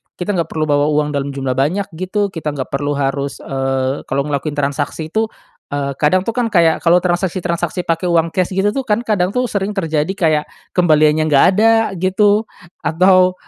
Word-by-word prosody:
kita 180 +3 -3
nggak 165 - 0
perlu 155 -1 -3
bawa 145 -1 +2
uang 150 0 +1
dalam 140 -1 -3
jumlah 135 -2 -2
banyak 150 +10 0
gitu 200 +2 -1
kita 155 -4 -4
nggak 135 -2 -5
perlu 145 +1 -1
harus, 140 0 -2
eee, 135 0 -2
kalau 140 +1 0
ngelakuin 145 +1 -3
transaksi 145 +2 -3
itu, 220 +3 +1 0.4
eee, 140 -1 -3
kadang 185 +5 +2
tuh 230 - -2
kan 245 0 -1
kayak 170 -7 +3
kalau 175 +1 +3
transaksi-transaksi 175 -1 -1
pakai 165 +1 -1
uang 165 -1 +2
cash 185 +1 -1
gitu 195 +2 +2
tuh 265 +2 -4
kan 215 +3 +1
kadang 200 -3 0
tuh 250 -2 0
sering 200 0 -2
terjadi 160 -5 -1
kayak 155 -5 +1 0.3
kembaliannya 155 -3 +3
nggak 145 -3 +5
ada 225 +2 +5 0.3
gitu 205 +4 +2 0.4
atau, 185 +2 +4
165 Hz, 185 wpm, -17 LUFS, 145-190 Hz, 0.4 s, nggak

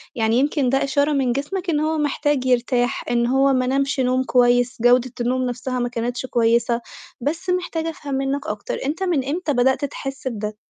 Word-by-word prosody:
يعني 225 -1 +1
يمكن 285 -2 +1
ده 270 +1 +2
إشارة 285 +2 +1
من 265 -3 +1
جسمك 340 +8 -3
إن 300 - +1
هو 315 +1 0
محتاج 290 -2 0
يرتاح، 245 -1 +1
إن 235 0 +2
هو 270 +2 +3
ما 255 -1 +1
نامش 275 +1 0
نوم 255 0 +2
كويس، 245 -1 +3
جودة 245 +1 +4
النوم 255 +2 0
نَفْسها 250 +1 -3
ما 245 - -1
كانتش 240 +1 -3
كويسة. 235 -1 +1 0.4
بس 325 +8 -3
محتاجة 350 -3 -1
أفهم 290 -3 -6
منّك 275 +2 -2
أكتر، 210 -1 -4
أنت 315 +7 -2
من 330 -8 0
إمتى 310 +1 -1
بدأت 265 +3 +2
تحس 270 -1 -6
بده؟ 215 -3 -4
260 Hz, 185 wpm, -21 LUFS, 245-290 Hz, 0.4 s, جودة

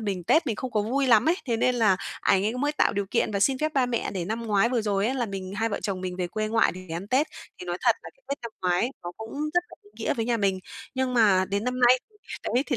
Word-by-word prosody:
mình 195 -5 -3
Tết 320 - +3
mình 220 -4 -1
không 260 - -4
có 215 - +1
vui 265 +5 0
lắm 235 +3 +5
ấy, 345 - +3
thế 230 -2 +1
nên 250 +2 +2
là 215 -6 +4 0.2
ảnh 195 0 +3
ấy 225 +4 0
mới 290 +3 0
tạo - - +2
điều 200 -1 -1
kiện 230 - +1
và 200 - -1
xin 265 +5 +3
phép 310 +2 -1
ba 260 -2 +3
mẹ 240 -2 -1
để 185 -4 -3
năm 225 +4 -3
ngoái 210 +1 +3
vừa 240 -2 0
rồi 205 -1 +1
ấy 260 - 0
là 245 -3 -1
mình 195 -2 -6
hai 225 +1 +1
vợ 205 - -3
chồng 195 -3 -2
mình 180 -1 -4
về 180 -1 -1
quê 215 +4 -2
ngoại 225 +1 +3
để 185 - -8
ăn 180 +4 -5
Tết, 270 +6 +3 0.3
thì - - -7
nói 175 0 -2
thật - - +4
là - - -9
cái - - -33
Tết 280 - -2
năm 235 - -4
ngoái 180 +7 +2
nó 175 - -6
cũng 220 0 -8 0.2
rất 350 - +5
là - - -13
ý 205 - -20
nghĩa 225 - -1
với 225 - -1
nhà 235 0 +1
mình. 195 -3 +1 0.4
Nhưng 260 -1 0
mà 200 -5 +5
đến 200 +2 -1
năm 250 0 -2
nay 250 +1 +6
thì 420 - -26 0.4
đấy 255 +3 +3
thì 260 - 0
225 Hz, 305 wpm, -26 LUFS, 195-250 Hz, 0.4 s, nay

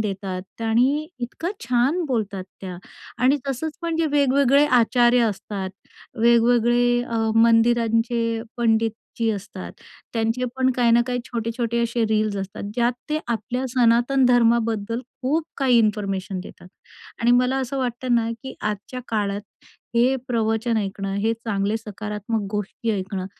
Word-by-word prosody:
देतात 195 -1 -5
आणि 255 +7 +2
इतकं 250 +8 -4
छान 250 +8 +2
बोलतात 210 -7 -2 0.2
त्या 185 -2 -6 0.5
आणि 270 +3 +5
तसंच 300 +4 -3
पण 335 -1 -1
जे 330 -1 +1
वेगवेगळे 280 0 +4
आचार्य 245 -1 +4
असतात, 200 -2 -3 0.5
वेगवेगळे 240 +1 +4
अ, 235 -1 -4 0.2
मंदिरांचे 230 0 +3
पंडितजी 225 0 0
असतात, 200 -3 -6 0.4
त्यांचे 225 +2 0
पण 260 0 +3
काही 240 -2 +3
ना 235 - +6
काही 245 0 -1
छोटे-छोटे 235 0 -2
असे 235 0 0
रील्स 215 -1 +1
असतात. 195 +1 -5
ज्यात 240 +1 +2 0.2
ते 305 - +1
आपल्या 240 +3 -2
सनातन 245 +2 +3
धर्माबद्दल 230 -2 +2 0.2
खूप 300 +5 +1
काही 260 -3 +4
इन्फॉर्मेशन 200 -4 -1
देतात. 180 - -12 0.5
आणि 235 - +3
मला 250 +2 +3
असं 265 +1 -3
वाटतं 250 -1 -1
ना, 230 -1 +1
की 265 - -7
आजच्या 210 +4 -4
काळात 205 -2 -1 0.6
हे 250 +3 +4
प्रवचन 225 0 0
ऐकणं, 195 -1 -2
हे 215 +3 +1
चांगले 215 -2 -1
सकारात्मक 210 0 -4
गोष्टी 210 +3 -3
ऐकणं, 190 -1 -4
230 Hz, 135 wpm, -23 LUFS, 215-245 Hz, 0.6 s, ना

